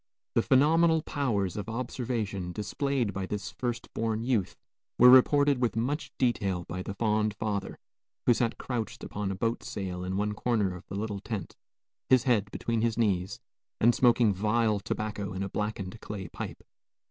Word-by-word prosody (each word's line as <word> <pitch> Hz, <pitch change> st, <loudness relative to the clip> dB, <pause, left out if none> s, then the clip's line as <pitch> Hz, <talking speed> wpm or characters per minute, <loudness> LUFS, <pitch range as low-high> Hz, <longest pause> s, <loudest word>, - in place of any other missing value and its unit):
The -, -, +4 dB
phenomenal 160 Hz, +4 st, +4 dB
powers 105 Hz, -10 st, -1 dB
of 105 Hz, +1 st, -4 dB
observation 115 Hz, -6 st, -3 dB
displayed 115 Hz, +3 st, -1 dB
by 95 Hz, 0 st, -3 dB
this 105 Hz, +1 st, -4 dB
first 120 Hz, +1 st, -4 dB
born 110 Hz, 0 st, -1 dB
youth 115 Hz, -7 st, 0 dB, 0.4 s
were 125 Hz, +1 st, +9 dB
reported 140 Hz, +1 st, +5 dB
with 120 Hz, -, +1 dB
much 130 Hz, +7 st, -1 dB
detail 100 Hz, -8 st, 0 dB
by 90 Hz, +2 st, -5 dB
the 100 Hz, +2 st, -5 dB
fond 105 Hz, -1 st, +1 dB
father, 100 Hz, -2 st, -3 dB, 0.5 s
who 120 Hz, -, +6 dB
sat 115 Hz, 0 st, 0 dB
crouched 120 Hz, -4 st, -4 dB
upon 105 Hz, -1 st, -3 dB
a 95 Hz, -, -2 dB
boat 115 Hz, +4 st, -1 dB
sail 95 Hz, -6 st, -5 dB
in 95 Hz, +1 st, -2 dB
one 105 Hz, +1 st, 0 dB
corner 105 Hz, -5 st, 0 dB
of 90 Hz, -, -12 dB
the -, -, -6 dB
little 105 Hz, 0 st, -3 dB
tent, 105 Hz, -1 st, -5 dB, 0.5 s
his 130 Hz, -2 st, +5 dB
head 110 Hz, -6 st, +2 dB
between 115 Hz, +2 st, -2 dB
his 115 Hz, -1 st, 0 dB
knees, 100 Hz, -4 st, 0 dB, 0.4 s
and 120 Hz, +2 st, +5 dB
smoking 120 Hz, -4 st, +4 dB
vile 105 Hz, +2 st, +1 dB
tobacco 105 Hz, -1 st, -3 dB
in 95 Hz, +1 st, -3 dB
a 100 Hz, -, -3 dB
blackened 105 Hz, 0 st, -4 dB
clay 100 Hz, -4 st, -6 dB
pipe. -, -, -7 dB
110 Hz, 170 wpm, -29 LUFS, 100-120 Hz, 0.5 s, were